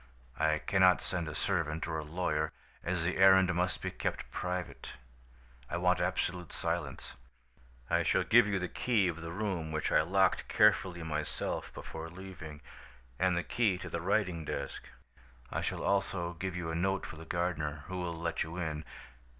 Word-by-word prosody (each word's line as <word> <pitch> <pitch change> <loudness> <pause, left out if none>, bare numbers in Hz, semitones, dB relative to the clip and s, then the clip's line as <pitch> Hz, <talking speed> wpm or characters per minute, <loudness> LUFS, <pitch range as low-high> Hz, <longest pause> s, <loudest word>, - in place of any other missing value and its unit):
I 80 0 +3
cannot 90 +3 +4
send 85 -3 -2
a 75 - -5
servant 80 -3 0
or 80 -2 -2
a - - -4
lawyer, 80 -1 -1 0.3
as 85 -1 -1
the 90 +2 0
errand 95 -1 +7
must 90 0 0
be - - -1
kept - - -3
private. 90 0 -4 0.8
I 85 - -1
want 90 0 +3
absolute 90 -1 -1
silence. - - -3 0.7
"'I - - +3
shall - - +2
give 120 -2 +6
you 100 -1 +1
the 90 -1 -1
key 110 -4 +2
of 85 -2 -3
the 85 0 -5
room, 90 -5 -2
which 80 0 -1
I - - +6
locked 95 +4 +2
carefully 85 -3 +3
myself 80 -2 -3
before 80 +1 -6
leaving, 85 -4 -9 0.6
and 90 -1 +3
the 85 - 0
key 110 -6 +1
to - - -7
the 85 - -2
writing 95 -3 +1
desk. - - -4 0.7
I - - -1
shall - - -2
also 95 -3 0
give 95 +1 -4
you 80 -2 -3
a - - -2
note 95 +3 0
for 80 - -8
the 80 - -8
gardener, 80 -4 -1
who 95 - -5
will 85 -2 -2
let 85 0 -2
you 85 +2 -3
in. 80 -3 -2
85 Hz, 175 wpm, -32 LUFS, 80-95 Hz, 0.8 s, errand